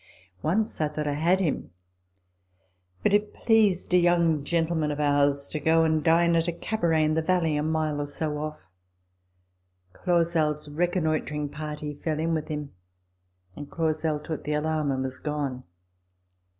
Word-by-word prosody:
Once 210 +3 0
I 155 - +2
thought 150 0 -4
I 145 - 0
had 170 +6 +2
him; 155 - -1 1.3
but - - +2
it 205 0 +1
pleased 210 -6 +2
a - - +7
young 170 -4 +3
gentleman 165 -1 0
of 145 0 -3
ours 145 -1 +2
to 155 - -3
go 165 +2 +3
and 155 -1 +1
dine 170 +1 +4
at 165 +1 +1
a - - +1
cabaret 170 -3 0
in 155 0 +2
the 160 - +1
valley 165 -2 +1
a 150 - 0
mile 155 -1 -1
or 145 - -3
two 150 +2 -2
off. 150 +1 -5 1.3
Clausel's 165 - 0
reconnoitring 155 -2 -1
party 150 0 -5
fell 155 +1 -3
in 165 +1 0
with 155 -1 -2
him, 150 -2 -5 0.8
and 145 - -8
Clausel 155 -2 -1
took 155 +1 -6
the 150 - -2
alarm 155 0 0
and 130 0 -1
was 130 -1 -5
gone. 145 -4 -3
155 Hz, 160 wpm, -26 LUFS, 150-170 Hz, 1.3 s, a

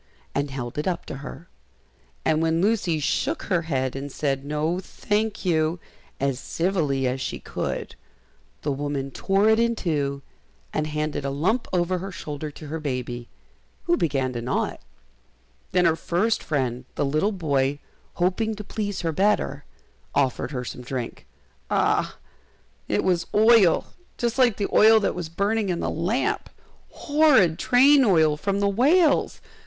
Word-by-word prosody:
and 140 +1 -1
held 130 0 -5
it 150 - -2
up 175 -2 -2
to - - -6
her; 145 +3 -9 0.8
and 155 0 +2
when 165 0 +1
Lucy 190 -5 +1
shook 140 - -1
her 180 -4 +1
head 135 -6 -2
and 140 +1 -5
said, 135 -1 -1
"No, 150 +4 -1
thank 210 +2 -2
you," 160 -1 +1 0.4
as 135 -2 0
civilly 160 -8 0
as 130 +1 -1
she - - -3
could, - - -4 0.7
the 145 - 0
woman 140 -1 -3
tore 195 +6 +1
it 220 0 +5
in 235 0 +2
two, 140 -7 -2 0.5
and 155 0 -1
handed 150 -1 -2
a 140 - -1
lump 180 - 0
over 180 0 +1
her 195 +2 -6
shoulder 150 -3 -6
to 150 +1 -11
her 160 +2 -4
baby, 125 -4 -4 0.5
who 345 - +2
began 135 - 0
to 120 - -4
gnaw 125 +2 0
it. - - -12 0.9
Then 180 -1 +3
her 165 -1 +4
first 185 +7 0
friend, 130 -4 -2
the - - 0
little 155 +9 +1
boy, 145 -7 0 0.4
hoping 205 +5 0
to 210 - -7
please 205 -1 -4
her 165 - -1
better, 190 - +1 0.5
offered 130 -3 +1
her 125 -3 -4
some 125 - -7
drink. 125 -1 -5 0.4
Ah! - - +1 0.7
it - - 0
was 180 -2 +1
oil, 215 -5 +5 0.2
just 240 +2 -1
like 245 -5 +4
the 200 - -1
oil 220 +1 +7
that 210 - 0
was 175 -3 -5
burning 200 +4 0
in 175 -1 -1
the - - -1
lamp! 190 - -1 0.4
horrid 285 - +3
train 270 +3 +5
oil 160 -8 +4
from 200 +6 -1
the 200 - +3
whales! 285 - +3
165 Hz, 160 wpm, -24 LUFS, 140-205 Hz, 0.9 s, oil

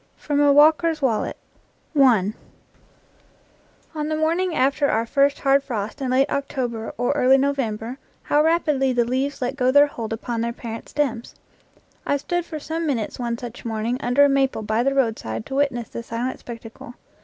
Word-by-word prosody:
FROM 290 -1 -1
A 290 -1 +5
WALKER'S 310 +2 +4
WALLET 250 -7 0 0.6
On 230 -8 +4 1.6
the 310 0 -2
morning 330 +3 0
after 280 +2 +2
our 225 +1 +1
first 280 +3 +2
hard 275 0 +3
frost 220 0 -5
in 260 - -1
late 265 +2 +3
October 245 -5 -3
or 245 +1 +1
early 270 -2 +4
November 260 -3 -2 0.2
how 295 - +2
rapidly 305 -5 +2
the 240 -1 +2
leaves 265 +3 -2
let 250 +2 -2
go 255 -2 +1
their 285 +2 +6
hold 230 -6 -6
upon 230 +1 -3
their 235 0 -2
parent 230 -1 -8
stems! 250 -6 -2 0.7
I 285 - +1
stood 350 +4 -2
for 315 - -6
some 320 +2 -3
minutes 240 -6 -2
one 235 -1 -2
such 240 -1 -8
morning 225 +2 -2
under 245 +4 +4
a - - +5
maple 270 -4 +1
by 215 +2 0
the 275 +2 +1
roadside 220 - -1
to - - -8
witness 270 -5 0
the - - -6
silent 235 +2 -4
spectacle. 235 0 -10
265 Hz, 170 wpm, -22 LUFS, 235-285 Hz, 1.6 s, their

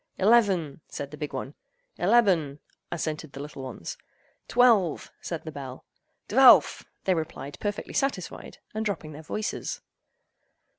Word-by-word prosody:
"Eleven!" 190 -9 +3
said 140 -1 -6
the 150 - -8
big 150 -1 -4
one. 135 +1 -5 0.5
"Eleben!" 180 -8 +3 0.3
assented 155 -3 -3
the - - -8
little 145 -1 -7
ones. 130 -10 -7 0.5
"Twelve!" 225 -9 +3
said 170 -2 -4
the 160 - -6
bell. 135 -3 -8 0.4
"Dvelf!" - - +7 0.2
they 190 - +3
replied 155 -4 -5
perfectly 205 0 -3
satisfied, 270 -11 -2 0.2
and 220 +1 -2
dropping 195 -7 -3
their 150 +1 -9
voices. 215 +7 -3
160 Hz, 130 wpm, -27 LUFS, 145-205 Hz, 0.5 s, Dvelf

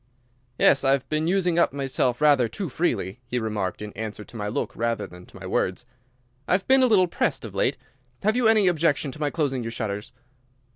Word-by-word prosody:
"Yes, 140 - +4
I 135 0 +4
have 140 -2 -1
been 155 +1 0
using 180 -2 +2
myself 135 -3 0
up - - -22
rather 145 -5 +5
too 180 - -5
freely," 120 - -1
he 125 - -2
remarked, 105 -4 -3
in 105 - -7
answer 110 -1 -6
to 115 - -15
my 105 -2 -3
look 105 - -3
rather 115 0 -1
than 90 0 -13
to - - -14
my - - -9
words; 95 +7 -1 0.6
"I - - +1
have 185 +1 +1
been 265 0 +5
a 255 - +5
little 200 -6 +5
pressed - - -1
of - - -8
late. - - +1 0.5
Have 215 +2 +2
you 245 -2 +3
any 220 -2 +5
objection 155 -4 +1
to 150 - -11
my 150 -1 0
closing 140 -5 -1
your 115 - -4
shutters?" 105 -3 -4
135 Hz, 220 wpm, -25 LUFS, 110-170 Hz, 0.6 s, rather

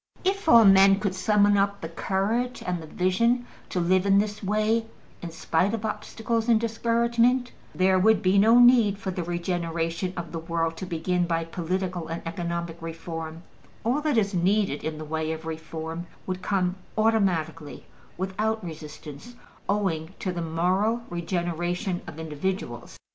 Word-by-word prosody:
If 385 -2 0
all 230 -4 +8
men 195 0 +7
could 200 -2 -1
summon 205 +1 +3
up 200 0 +1
the 165 - -4
courage 205 +9 -1
and 180 -2 -2
the 160 - -9
vision 230 +9 +1 0.2
to 180 - -1
live 185 +2 +2
in 195 0 +5
this 210 +1 0
way 215 +3 +1 0.3
in 170 - -5
spite 170 +5 0
of 220 -1 -5
obstacles 225 +1 -2
and 225 -2 +5
discouragement, 235 +2 +1 0.2
there 185 0 +3
would 215 +1 +4
be 190 +1 +4
no 225 +4 +6
need 240 -5 +6
for 195 -1 -4
the 180 -1 -3
regeneration 170 0 -2
of 170 -2 -5
the 165 - -4
world 165 0 -2
to 185 - -6
begin 175 +1 0
by 165 -1 0
political 175 0 -3
and 165 +1 -5
economic 170 0 -4
reform: 165 0 -6 0.4
all 250 +6 +1
that 300 -5 +1
is 200 -2 +1
needed 190 -2 +1
in 155 -1 -3
the 155 - -6
way 160 +1 -2
of 160 0 -8
reform 160 +1 -6 0.2
would 185 0 -4
come 185 -1 0 0.2
automatically, 175 -9 0 0.3
without 215 +4 -1
resistance, 155 - -9 0.3
owing 190 -4 -1
to 185 - -3
the 175 -1 -4
moral 185 +8 +1
regeneration 175 +2 -2
of - - -8
individuals. 160 +5 -4
185 Hz, 160 wpm, -26 LUFS, 165-215 Hz, 0.4 s, all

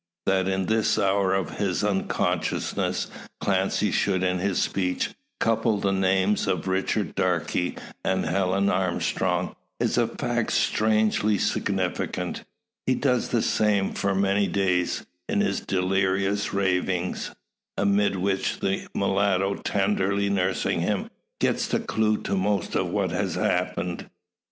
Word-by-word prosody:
That 95 -1 +2
in 95 0 0
this 110 +2 +2
hour 95 -1 +2
of 95 -2 -3
his 100 -1 0
unconsciousness 100 -2 0 0.3
Clancy - - +1
should 95 -2 +1
in 90 -1 +1
his 95 0 0
speech 90 -2 0 0.3
couple 115 -1 +2
the 100 0 +1
names 95 +1 +2
of 95 0 -1
Richard 95 +2 0
Darke 90 -3 0 0.5
and 95 0 0
Helen 95 +3 +1
Armstrong 95 -2 0 0.2
is - - +1
a - - +3
fact - - -2
strangely 110 -1 +2
significant, 95 -2 -1 0.4
he 130 - +3
does 125 -3 +1
the 115 -2 +1
same 105 -2 +2
for 100 -1 0
many 100 +1 +2
days, 90 -3 0 0.2
in - - +1
his 210 - 0
delirious 95 +2 0
ravings; 90 -2 -1 0.4
amid 100 0 +2
which 95 +1 -1
the 95 0 -1
mulatto, 100 0 +2
tenderly 100 0 0
nursing 95 -1 0
him, - - -1 0.3
gets - - +1
the - - 0
clue 110 -1 +1
to 100 - -1
most 100 +2 0
of - - +1
what - - 0
has - - -1
happened. 90 -1 -1
95 Hz, 130 wpm, -25 LUFS, 95-100 Hz, 0.5 s, a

